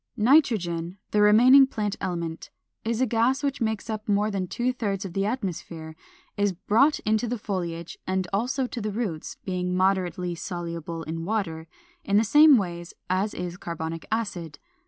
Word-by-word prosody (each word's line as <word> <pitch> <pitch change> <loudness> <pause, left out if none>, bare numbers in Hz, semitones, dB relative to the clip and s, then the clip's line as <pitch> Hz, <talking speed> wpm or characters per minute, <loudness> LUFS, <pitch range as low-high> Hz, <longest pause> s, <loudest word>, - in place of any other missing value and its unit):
Nitrogen, 205 - +2
the 210 - +3
remaining 250 +6 +7
plant 210 -5 -2
element, 170 -3 -4 0.3
is 230 +2 -1
a - - +4
gas 245 +4 +1
which 280 -2 -1
makes 220 -1 -1
up 215 -1 -5
more 205 +1 +2
than 190 -2 -2
two 245 +6 -1
thirds 200 -5 -2
of 180 - -6
the 195 +2 0
atmosphere, 170 -8 -4 0.4
is 205 -1 +1
brought 230 - +3
into 220 +2 +1
the 245 +1 -2
foliage 170 -5 -4
and 185 -1 0
also 255 +6 0
to 245 -1 -5
the 210 0 -2
roots 200 -8 -4
(being 180 -1 -1
moderately 185 -2 +1
soluble 170 -1 -5
in 165 +1 -5
water) 170 -5 -2 0.4
in 200 0 +2
the 215 - +5
same 295 +5 +7
ways 175 -4 -4 0.2
as 195 +3 0
is 180 0 -5
carbonic 165 -3 -5
acid. 190 -8 -3
200 Hz, 165 wpm, -26 LUFS, 175-225 Hz, 0.4 s, remaining